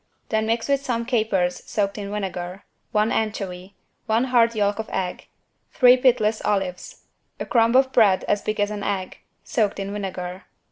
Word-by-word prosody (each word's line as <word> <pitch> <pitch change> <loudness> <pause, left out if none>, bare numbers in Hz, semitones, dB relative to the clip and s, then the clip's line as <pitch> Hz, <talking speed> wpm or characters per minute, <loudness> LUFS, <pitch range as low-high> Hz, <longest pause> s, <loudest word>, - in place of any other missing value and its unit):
Then 220 0 0
mix 230 0 0
with 280 -1 +1
some 235 -3 -2
capers 215 -7 0
soaked 200 -2 -1
in 200 -1 -5
vinegar, 190 -2 -5 0.3
one 215 +1 +2
anchovy, 195 -3 -3 0.3
one 225 +2 +2
hard 235 -3 +3
yolk 205 0 0
of 220 - -4
egg, 185 -1 -4 0.4
three 250 -3 +6
pitless 235 -4 +2
olives, 190 -3 -2 0.4
a - - -3
crumb 230 0 +3
of 265 0 +4
bread 205 -7 +4
as 205 - 0
big 215 0 -3
as 205 0 +1
an 210 -1 -4
egg, 195 -2 -3 0.2
soaked 215 -7 0
in 195 +1 -4
vinegar. 185 -2 -5
210 Hz, 170 wpm, -23 LUFS, 195-230 Hz, 0.4 s, three